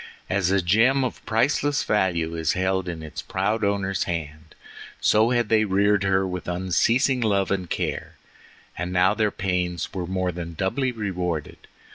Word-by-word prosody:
As 95 Hz, -2 st, +1 dB
a 95 Hz, -1 st, +2 dB
gem 115 Hz, +9 st, +3 dB
of 125 Hz, -, -4 dB
priceless 145 Hz, +6 st, +1 dB
value 85 Hz, -5 st, 0 dB
is 80 Hz, 0 st, 0 dB
held 95 Hz, 0 st, 0 dB
in 80 Hz, -2 st, -6 dB
its 80 Hz, -, -6 dB
proud 105 Hz, +4 st, -1 dB
owner's 100 Hz, -1 st, 0 dB
hand, 75 Hz, -2 st, -6 dB, 0.4 s
so 110 Hz, +2 st, +4 dB
had 120 Hz, -2 st, +1 dB
they 110 Hz, 0 st, +3 dB
reared 100 Hz, 0 st, +2 dB
her 95 Hz, 0 st, +2 dB
with 90 Hz, -1 st, -5 dB
unceasing 95 Hz, -, +1 dB
love 100 Hz, -4 st, +1 dB
and 95 Hz, -3 st, -2 dB
care: -, -, -3 dB, 0.6 s
and 90 Hz, 0 st, -4 dB
now 90 Hz, +2 st, +3 dB
their 110 Hz, -1 st, +1 dB
pains 90 Hz, -3 st, -2 dB
were 90 Hz, -2 st, -4 dB
more 95 Hz, 0 st, -1 dB
than 85 Hz, -1 st, -7 dB
doubly 130 Hz, -, 0 dB
rewarded. 90 Hz, -8 st, -4 dB
95 Hz, 160 wpm, -24 LUFS, 90-105 Hz, 0.6 s, so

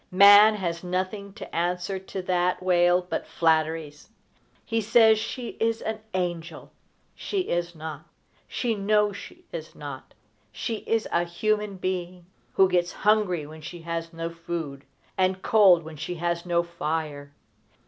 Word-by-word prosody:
Man 205 Hz, +3 st, +8 dB
has 175 Hz, -4 st, -3 dB
nothing 185 Hz, +3 st, -3 dB
to 230 Hz, -, -9 dB
answer 180 Hz, +3 st, -1 dB
to 190 Hz, 0 st, -6 dB
that 180 Hz, 0 st, 0 dB
wail 180 Hz, 0 st, +3 dB
but -, -, -3 dB
flatteries. 160 Hz, -2 st, 0 dB, 0.6 s
He 225 Hz, 0 st, 0 dB
says 220 Hz, 0 st, +5 dB
she 240 Hz, +2 st, -5 dB
is 225 Hz, 0 st, +1 dB
an 220 Hz, 0 st, -3 dB, 0.2 s
angel. 175 Hz, -2 st, -4 dB, 0.4 s
She 400 Hz, -2 st, -2 dB
is 175 Hz, -, -2 dB
not. 155 Hz, -1 st, -7 dB, 0.4 s
She 240 Hz, -3 st, -1 dB
knows 210 Hz, 0 st, +1 dB
she 190 Hz, -, -11 dB
is 160 Hz, -1 st, -7 dB
not. 140 Hz, -3 st, -9 dB, 0.4 s
She 225 Hz, -, -3 dB
is 225 Hz, -1 st, +1 dB
a 170 Hz, -, +2 dB
human 210 Hz, +4 st, -1 dB
being, 180 Hz, -1 st, -4 dB, 0.3 s
who 190 Hz, -, +5 dB
gets 180 Hz, -1 st, +1 dB
hungry 205 Hz, -7 st, +1 dB
when 155 Hz, +1 st, -11 dB
she 170 Hz, +2 st, -8 dB
has 165 Hz, 0 st, -4 dB
no 165 Hz, 0 st, -5 dB
food, 165 Hz, -4 st, -6 dB, 0.3 s
and 185 Hz, 0 st, +1 dB
cold 190 Hz, -6 st, +6 dB
when 155 Hz, 0 st, -10 dB
she 160 Hz, +4 st, -4 dB
has 170 Hz, +1 st, -2 dB
no 170 Hz, -1 st, +2 dB
fire. 155 Hz, -4 st, -4 dB
180 Hz, 150 wpm, -26 LUFS, 165-200 Hz, 0.6 s, Man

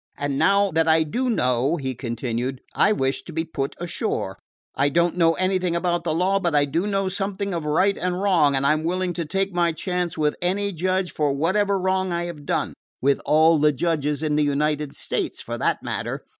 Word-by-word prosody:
"And 140 Hz, -1 st, -2 dB
now 200 Hz, +4 st, +3 dB
that 165 Hz, 0 st, +1 dB
I 160 Hz, 0 st, +4 dB
do 245 Hz, +12 st, -2 dB
know," 130 Hz, -, +1 dB
he 130 Hz, -3 st, -3 dB
continued, 120 Hz, +1 st, -3 dB
"I 205 Hz, -, +3 dB
wish 135 Hz, -9 st, 0 dB
to -, -, -8 dB
be 165 Hz, 0 st, -2 dB
put 140 Hz, -4 st, -4 dB
ashore. 175 Hz, -, -3 dB, 0.3 s
I 140 Hz, +1 st, +2 dB
don't 170 Hz, +3 st, +1 dB
know 165 Hz, -2 st, +4 dB
anything 185 Hz, -1 st, 0 dB
about 175 Hz, 0 st, 0 dB
the 165 Hz, -, 0 dB
law, 190 Hz, +3 st, +2 dB
but 170 Hz, -5 st, 0 dB
I 145 Hz, -1 st, +4 dB
do 165 Hz, +8 st, -1 dB
know 195 Hz, -1 st, 0 dB
something 195 Hz, +1 st, -2 dB
of 165 Hz, -3 st, -3 dB
right 185 Hz, +6 st, +2 dB
and 180 Hz, 0 st, -2 dB
wrong; 170 Hz, -8 st, +3 dB
and 135 Hz, +1 st, 0 dB
I 145 Hz, -, +5 dB
'm 155 Hz, 0 st, -2 dB
willing 180 Hz, +2 st, -1 dB
to 170 Hz, -1 st, -3 dB
take 195 Hz, +4 st, -1 dB
my 175 Hz, -1 st, +2 dB
chance 180 Hz, +1 st, -2 dB
with 150 Hz, -1 st, +1 dB
any 200 Hz, +3 st, 0 dB
judge 185 Hz, +2 st, -1 dB
for 145 Hz, -2 st, +1 dB
whatever 195 Hz, +7 st, +1 dB
wrong 185 Hz, 0 st, 0 dB
I 170 Hz, 0 st, -1 dB
have 155 Hz, -4 st, -8 dB
done -, -, -1 dB, 0.3 s
with 140 Hz, +1 st, +2 dB
all 160 Hz, +1 st, +5 dB
the 150 Hz, +1 st, +4 dB
judges 150 Hz, 0 st, -1 dB
in 150 Hz, -1 st, 0 dB
the 150 Hz, -, +3 dB
United 150 Hz, 0 st, 0 dB
States, -, -, -3 dB
for -, -, -5 dB
that -, -, 0 dB
matter. -, -, -4 dB
165 Hz, 210 wpm, -23 LUFS, 150-185 Hz, 0.3 s, I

